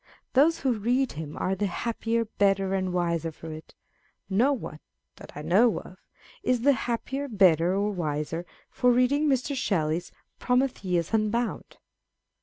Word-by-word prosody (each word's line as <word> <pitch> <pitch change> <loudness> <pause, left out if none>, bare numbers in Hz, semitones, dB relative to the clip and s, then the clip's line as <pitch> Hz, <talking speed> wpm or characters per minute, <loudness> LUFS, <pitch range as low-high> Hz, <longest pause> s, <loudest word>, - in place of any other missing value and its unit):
Those 305 +5 +4
who 250 -5 0
read 250 +5 +1
him 150 -1 -7
are 185 - 0
the 205 +2 -1
happier, 230 +4 -1
better, 195 -2 +1
and 185 -1 -1
wiser 170 -2 -1
for 160 +1 -9
it. 155 +1 -12 0.6
No 235 +9 +3
one 215 - -5 0.4
(that - - -12
I 150 - -6
know 200 +8 +4
of) 185 - -13 0.4
is 250 -2 +1
the 285 +4 +5
happier, 265 +3 -3
better, 185 - +3
or 205 +1 0
wiser 160 -2 -3 0.3
for 250 - +3
read 250 +1 +3
ing 295 +1 +2
Mr. 270 +1 0
Shelley's 170 - -1 0.3
Prometheus 225 -9 0
Unbound. 220 +2 -1
205 Hz, 150 wpm, -27 LUFS, 175-250 Hz, 0.6 s, the